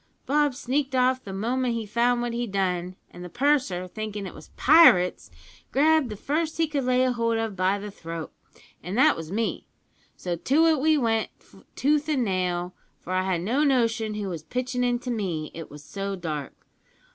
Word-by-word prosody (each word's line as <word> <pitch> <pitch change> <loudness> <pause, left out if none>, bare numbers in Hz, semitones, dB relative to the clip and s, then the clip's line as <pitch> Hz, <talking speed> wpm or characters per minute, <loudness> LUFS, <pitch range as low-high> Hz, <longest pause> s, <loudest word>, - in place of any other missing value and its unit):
Bob 290 -1 +2
sneaked 270 +1 -1
off 255 0 +2
the 195 - -7
moment 240 +5 -1
he 225 -1 -3
found 240 +3 +1
what 240 -1 -3
he'd 235 -2 -3
done, 185 -2 -1 0.2
and 175 - -10
the 180 - -7
purser, 245 - +1
thinkin' 210 +1 -5
it 185 - -7
was 155 - -13
pirates, 190 - +5 0.4
grabbed 310 -1 +3
the 210 - -5
first 310 +8 -2
he 330 - +3
could 290 -4 -2
lay 255 0 +3
hold 230 -2 0
of 225 -3 -2
by 190 +2 +1
the 205 0 -7
throat, 165 -3 -7 0.5
and 180 +6 -5
that 300 +4 +5
was 165 0 -7
me, 225 +3 -2 0.5
so 175 -1 -3
to 280 - +2
it 320 -3 +3
we 310 +1 +4
went 225 -4 +1 0.5
tooth 295 +2 +1
an' 275 -5 +1
nail, 180 -3 -1 0.3
for 185 - -6
I 185 - +2
had 185 -3 0
no 245 - +1
notion 230 -6 +1
who 210 -1 -3
was 170 -4 -5
pitchin' 250 +8 -2
into 245 0 -1
me, 175 -9 -3
it 165 -1 -8
was 145 0 -12
so 195 +2 -4
dark. 155 -6 -5
225 Hz, 190 wpm, -25 LUFS, 185-260 Hz, 0.5 s, pirates